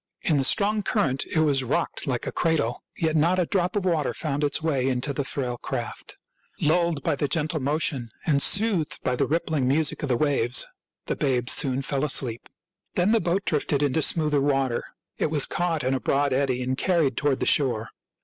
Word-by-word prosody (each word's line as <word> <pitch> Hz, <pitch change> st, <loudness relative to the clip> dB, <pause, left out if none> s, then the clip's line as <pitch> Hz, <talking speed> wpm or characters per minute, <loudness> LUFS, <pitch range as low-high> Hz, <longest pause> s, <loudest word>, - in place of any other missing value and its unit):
In 155 Hz, -, +2 dB
the 135 Hz, -, +2 dB
strong 210 Hz, +9 st, +2 dB
cur 205 Hz, +1 st, 0 dB
rent 130 Hz, 0 st, -2 dB
it 160 Hz, -, +1 dB
was 140 Hz, -4 st, +2 dB
rocked 125 Hz, -, -1 dB
like -, -, -1 dB
a -, -, -3 dB
cradle, 155 Hz, -8 st, 0 dB, 0.2 s
yet 160 Hz, -1 st, 0 dB
not 170 Hz, +4 st, +3 dB
a 180 Hz, -, +2 dB
drop 180 Hz, +3 st, -1 dB
of 200 Hz, -2 st, -1 dB
water 165 Hz, -5 st, 0 dB
found 150 Hz, -2 st, -2 dB
its 145 Hz, 0 st, +1 dB
way 145 Hz, -5 st, 0 dB
into 130 Hz, +2 st, -1 dB
the 140 Hz, -, -2 dB
frail 125 Hz, -2 st, -3 dB
craft. -, -, -6 dB, 0.4 s
Lulled 165 Hz, -2 st, +1 dB
by -, -, +1 dB
the 145 Hz, -, -1 dB
gentle 155 Hz, +1 st, -1 dB
motion 140 Hz, -3 st, 0 dB, 0.2 s
and 145 Hz, -4 st, +2 dB
soothed 200 Hz, -6 st, +1 dB
by 125 Hz, -, 0 dB
the -, -, 0 dB
rippling 155 Hz, -4 st, 0 dB
music 150 Hz, +3 st, +1 dB
of 145 Hz, -, -3 dB
the 125 Hz, -, +2 dB
waves, 135 Hz, -4 st, +1 dB, 0.4 s
the -, -, -2 dB
babes 125 Hz, -3 st, +1 dB
soon 135 Hz, -1 st, +1 dB
fell 135 Hz, 0 st, -1 dB
asleep. 130 Hz, -5 st, -1 dB, 0.5 s
Then 180 Hz, +4 st, +2 dB
the 230 Hz, -, +3 dB
boat 180 Hz, +3 st, -1 dB
drifted 145 Hz, -2 st, 0 dB
into 145 Hz, +3 st, +1 dB
smoother 150 Hz, -2 st, +2 dB
water. 135 Hz, -3 st, 0 dB, 0.3 s
It -, -, +1 dB
was 150 Hz, -3 st, +2 dB
caught 170 Hz, -3 st, -1 dB
in 130 Hz, +1 st, +1 dB
a 135 Hz, -, 0 dB
broad 140 Hz, 0 st, +1 dB
eddy 130 Hz, -2 st, 0 dB
and 130 Hz, +1 st, -1 dB
carried 160 Hz, -5 st, +1 dB
toward 145 Hz, -1 st, 0 dB
the -, -, -1 dB
shore. 120 Hz, -6 st, +1 dB
145 Hz, 205 wpm, -25 LUFS, 130-165 Hz, 0.5 s, not